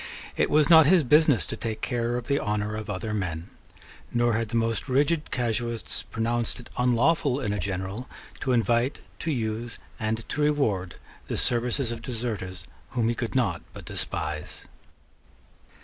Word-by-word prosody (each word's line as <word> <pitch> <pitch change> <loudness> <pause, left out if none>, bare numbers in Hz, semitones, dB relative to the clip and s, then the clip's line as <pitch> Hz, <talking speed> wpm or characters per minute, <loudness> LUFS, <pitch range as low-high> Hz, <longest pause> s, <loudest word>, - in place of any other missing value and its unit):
It - - +2
was 150 -1 +4
not 160 -2 +8
his 175 -1 +6
business 150 0 +5
to - - -5
take 110 -1 -4
care 120 -1 0
of 125 - -5
the 140 +2 +1
honour 105 0 -1
of 110 0 -5
other 105 +2 -3
men; 90 -4 -3 0.6
nor 120 -1 +2
had 115 0 0
the 115 - -3
most 115 +2 0
rigid 150 +4 +2
casuists 120 -1 -1
pronounced 115 +1 -2
it 120 - -12
unlawful 130 +3 +3
in 105 -7 -1
a 105 - -2
general 95 +5 -3 0.3
to 130 - -1
invite, 120 +2 +2 0.2
to 165 - -3
use, 115 -3 -2 0.2
and 110 +1 -2
to 150 - -1
reward 110 - +1 0.3
the - - -2
services 120 +1 +1
of 115 - -5
deserters 110 -7 -4 0.3
whom 120 -3 +1
he - - +2
could 120 +1 -4
not 95 -10 +1
but - - -9
despise. 75 -1 -3
115 Hz, 165 wpm, -27 LUFS, 110-130 Hz, 0.6 s, not